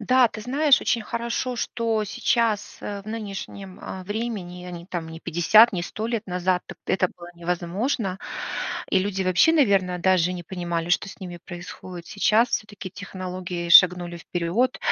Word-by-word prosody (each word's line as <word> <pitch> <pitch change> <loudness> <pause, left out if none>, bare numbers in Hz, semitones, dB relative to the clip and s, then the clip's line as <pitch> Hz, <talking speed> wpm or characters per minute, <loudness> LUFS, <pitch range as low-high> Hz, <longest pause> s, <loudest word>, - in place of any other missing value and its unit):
Да, 255 +2 +4
ты 215 - -8
знаешь, 280 +4 +4
очень 235 - +1
хорошо, 235 +3 -2
что 225 -2 -1
сейчас, 215 0 0
э, 205 -1 -4
в 205 - -23
нынешнем, 200 -3 -6
э, 190 - -6
времени, 205 -4 -4
а - - -6
не 170 -1 -8
там, 170 -4 -4
не 160 0 -8
50, 215 +9 +5
не 180 -3 -2
100 215 +5 -4
лет 230 -2 -2
назад, 180 0 0
т - - -8
это 185 -1 +2
было 175 0 -12
невозможно. 180 +4 -2 0.7
И 190 - +4
люди 195 0 -1
вообще, 185 - +4
наверное, 195 - +3
даже 180 -1 +3
не 175 - -6
понимали, 170 -1 -3
что 180 - +2
с - - -11
ними 175 -2 -7
происходит. 175 0 -9
Сейчас 220 +3 +3
всё-таки 205 -4 -4
технологии 185 -2 -5
шагнули 175 -1 +7
вперёд. 175 +10 0
190 Hz, 165 wpm, -24 LUFS, 175-220 Hz, 0.7 s, шагнули